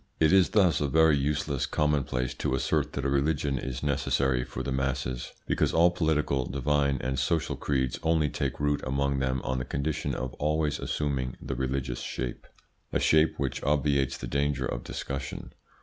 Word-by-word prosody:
It 80 +2 +4
is 95 -2 +6
thus 90 -10 +3
a 75 - +2
very 80 +2 +5
useless 70 0 -1
commonplace 70 -4 0
to - - -1
assert - - 0
that 70 - -3
a - - +2
religion 70 -1 +1
is 65 +1 -5
necessary 70 -2 +1
for - - -6
the 70 - -3
masses, 65 -2 -2
because - - +1
all 85 +2 +6
political, 75 -6 0
divine, 70 0 +1
and 65 0 -1
social 80 +5 0
creeds 65 -3 -1
only 80 -2 +2
take 70 0 -3
root 75 0 +1
among 70 +1 0
them 65 -1 -1
on 65 0 -1
the - - -2
condition 70 +4 -2
of 65 +1 -4
always 75 0 0
assuming 70 -4 -2
the 70 - -4
religious 65 0 -2
shape 65 -2 -5 0.4
a - - +1
shape 80 +1 +3
which 70 -2 -2
obviates 70 -2 +1
the - - -6
danger 70 +1 0
of - - -3
discussion. 70 -1 -5
70 Hz, 175 wpm, -28 LUFS, 65-75 Hz, 0.4 s, is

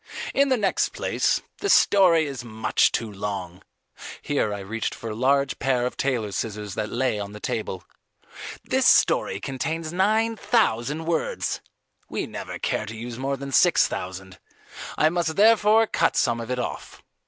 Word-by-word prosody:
"In 280 0 +3
the 260 - +3
next 200 -4 0
place, - - 0 0.2
the 405 - -2
story 180 - +5
is 135 -4 -6
much 110 -2 +1
too 110 -2 -3
long." 95 -3 -5 0.6
Here 140 -7 0
I 100 -1 -4
reached 110 +4 -4
for 115 - -6
a - - -5
large 140 +4 +1
pair 125 -2 +1
of 125 - -3
tailor's 115 -7 -1
scissors 105 -2 -4
that 105 +1 -3
lay 120 -3 -1
on 100 0 -6
the 105 - -9
table. 105 -6 -4 0.8
"This - - +2
story - - +3
contains 160 +5 -4
nine 220 +5 +2
thousand 155 - 0
words. 165 -1 -2 0.5
We - - -3
never - - -7
care - - -2
to 115 +2 -7
use 120 +1 -7
more 135 +1 -2
than 140 +1 -7
six - - +4
thousand. 95 0 -7 0.6
I 155 - +4
must 165 -1 -1
therefore 220 +1 +5
cut - - +1
some 120 -1 +1
of 115 - -7
it 125 - -1
off." 125 - -6
125 Hz, 165 wpm, -24 LUFS, 110-165 Hz, 0.8 s, story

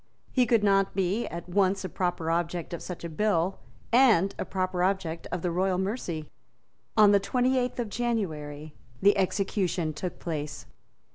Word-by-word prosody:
He 250 -2 +3
could 225 -2 +3
not 195 -1 +3
be 195 +4 0
at 170 +1 -7
once 190 +1 +1
a - - -1
proper 170 -1 -1
object 170 0 -2
of 170 - -5
such 180 -2 -7
a - - -3
bill 185 +1 0 0.3
and 220 -7 +5
a - - -1
proper 185 -1 -2
object 180 -3 -1
of 180 - -3
the 175 - 0
royal 185 +1 +1
mercy. 185 -6 -3 0.7
On 210 -2 +7
the 200 - +5
twenty 250 +6 +1
eighth 250 0 -2
of 235 - -1
January 155 -11 -3 0.3
the 205 +1 +5
execution 190 -4 0
took 180 +3 -5
place. 150 -3 -5
185 Hz, 165 wpm, -28 LUFS, 170-205 Hz, 0.7 s, On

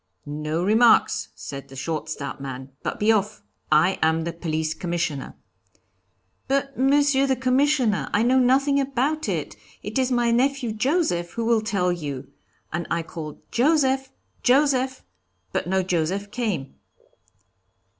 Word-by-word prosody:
'No 155 +3 -3
remarks,' 220 +4 +4
said 140 -1 -8
the 135 - -13
short, 155 +3 -3
stout 140 -2 -5
man, 130 0 -7
'but - - -4
be 210 +2 +4
off; 210 0 0 0.3
I 155 +5 +4
am 160 0 +2
the 170 0 -3
Police 160 -2 -2
Commissioner.' 165 -4 -3 1.1
'But, 275 0 0
Monsieur 275 +1 +3
the 265 - +2
Commissioner, 255 - +2
I 210 - +2
know 255 +2 +4
nothing 275 +3 +3
about 275 +3 -1
it; - - -3 0.3
it - - -2
is 260 0 +1
my 240 -1 +2
nephew 260 0 +1
Joseph 215 - 0
who 230 +3 -2
will 230 -1 +3
tell 195 -5 0
you,' 145 -6 -5 0.4
and 170 +1 -2
I 170 0 0
called 155 -2 -8
'Joseph! 265 -1 +2 0.3
Joseph!' 260 -1 +2 0.5
but - - -1
no 190 +1 +1
Joseph 185 +3 -1
came." 205 - -3
215 Hz, 140 wpm, -24 LUFS, 165-265 Hz, 1.1 s, remarks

